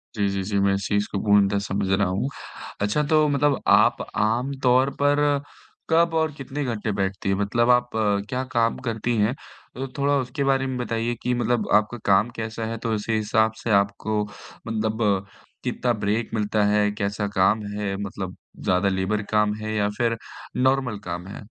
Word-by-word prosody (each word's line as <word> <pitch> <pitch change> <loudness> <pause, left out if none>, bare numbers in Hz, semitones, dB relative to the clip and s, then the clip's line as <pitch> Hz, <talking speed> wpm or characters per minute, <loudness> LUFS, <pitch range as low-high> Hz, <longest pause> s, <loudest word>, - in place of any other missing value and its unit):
जी, 100 -1 +1
जी, 100 0 -2
जी, 100 +1 -1
मैं 100 0 +3
इस 100 -3 -3
चीज़ 105 0 +1
को 100 - -1
पूर्णतः 100 -1 +4
समझ 100 0 -2
रहा 95 0 +2
हूँ। 95 +9 -1 0.5
अच्छा 105 +9 +1
तो 155 -1 +4
मतलब 145 -1 +2
आप - - +5 0.2
आमतौर 125 +4 +2
पर 145 0 +3 0.7
कब 165 +1 +3
और 160 -1 +2
कितने 140 +1 -4
घंटे 110 -4 -2
बैठती 95 0 -2
हैं? 95 - +2
मतलब 115 +4 +1
आप 125 0 +3 0.4
क्या 130 0 -1
काम 115 0 +2
करती 115 +1 -1
हैं? 105 +4 +2 0.4
तो 135 +1 -4
थोड़ा 140 +1 +2
उसके 135 +3 -3
बारे 135 -1 +2
में 130 -1 -3
बताइए 120 -1 -1
कि 125 - 0
मतलब 120 -1 0
आपका 105 +3 +3
काम 100 +4 +4
कैसा 110 0 -4
है 115 - -3
तो 115 -2 0
उसी 105 +2 -2
हिसाब 110 +1 +2
से 115 - -1
आपको 100 +1 +1 0.4
मतलब 110 -3 0 0.4
कितना 120 -1 0
ब्रेक 110 +2 -1
मिलता 105 -1 +1
है? 105 0 +3
कैसा 100 0 -2
काम 100 +3 +3
है? 100 -2 -2
मतलब 100 -2 -5 0.3
ज़्यादा 90 +2 +2
लेबर 95 +3 0
काम 105 -1 +3
है 110 0 -3
या 105 -1 +1
फिर 115 -2 +1 0.5
नॉर्मल 130 -5 +1
काम 90 +2 -5
है? 100 - -8
110 Hz, 180 wpm, -24 LUFS, 100-125 Hz, 0.7 s, आप